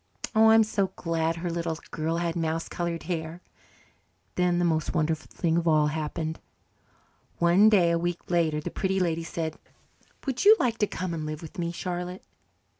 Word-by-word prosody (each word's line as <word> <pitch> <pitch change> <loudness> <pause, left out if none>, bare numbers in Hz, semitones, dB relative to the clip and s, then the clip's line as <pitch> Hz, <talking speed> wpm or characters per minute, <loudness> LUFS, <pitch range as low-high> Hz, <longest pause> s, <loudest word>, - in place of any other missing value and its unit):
Oh, 220 0 +6
I'm 225 0 +7
so 205 -2 0
glad 165 -1 -1
her 170 +1 -3
little 165 -1 -2
girl 160 +1 -1
had 170 0 -1
mouse 165 -1 -1
coloured 170 -1 -3
hair. 165 -1 -4 0.9
Then 180 -1 +1
the 175 - +2
most 160 0 0
wonderful 155 0 0
thing 165 -1 0
of 170 0 0
all 155 -2 +4
happened. 160 +1 -3 1.0
One 175 +5 +5
day 180 -6 +4
a 170 - +1
week 175 +1 -3
later 165 -3 +2
the 150 - -5
Pretty 190 0 -1
Lady 165 -2 0
said, 165 -2 -4 0.7
"Would 265 -3 -1
you 425 +2 +9
like 235 -3 0
to 210 - +2
come 185 -3 -4
and 160 -2 -4
live 155 +1 -5
with 170 +4 -9
me, 170 -1 -1
Charlotte?" 180 +1 -5
170 Hz, 180 wpm, -27 LUFS, 160-180 Hz, 1.0 s, you